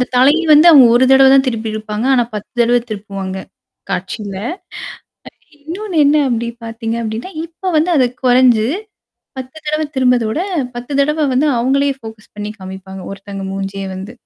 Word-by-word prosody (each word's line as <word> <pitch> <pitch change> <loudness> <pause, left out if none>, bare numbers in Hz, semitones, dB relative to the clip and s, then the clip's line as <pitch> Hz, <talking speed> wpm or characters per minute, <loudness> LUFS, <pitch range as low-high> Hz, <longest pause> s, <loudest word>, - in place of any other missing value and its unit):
அந்த - - +3
தலை 260 +4 +5 0.2
வந்து 305 +2 +7
அவுங்க 275 -6 +8
ஒரு 255 - +4
தடவ 270 0 +7
தான் 270 0 +5
திருப்பியிருப்பாங்க. 220 -2 -3
ஆனா 245 - +3
10 210 -1 -6
தடவ 240 +1 +3
திருப்புவாங்க. 195 -2 -5 0.5
காட்சியில. 195 +2 -4 0.9
அ - - -17 0.3
இன்னொன்னு 345 +6 -6
என்ன 290 +2 +4
அப்பிடி 235 -1 -1 0.2
பார்த்தீங்க 225 0 -4
அப்பிடின்னா, 225 +10 -5 0.2
இப்ப 350 +3 -5
வந்து 320 +4 +2
அது 260 -3 +4 0.2
குறைஞ்சு. 245 -3 +4 0.7
10 260 +3 -8
தடவ 305 +1 0
திரும்புறத 250 -2 +3
விட, 265 - -2 0.4
10 245 +4 -7
தடவ 300 +1 +1
வந்து 275 +4 +2
அவுங்களே 275 +4 +1
ஃபோக்கஸ் 220 -1 -12
பண்ணி 210 0 -5
காமிப்பாங்க. 190 0 -9
ஒருத்தங்க 195 0 -8
மூஞ்சியே 195 0 -4
வந்து. 190 +4 -8
235 Hz, 155 wpm, -16 LUFS, 210-275 Hz, 0.9 s, அவுங்க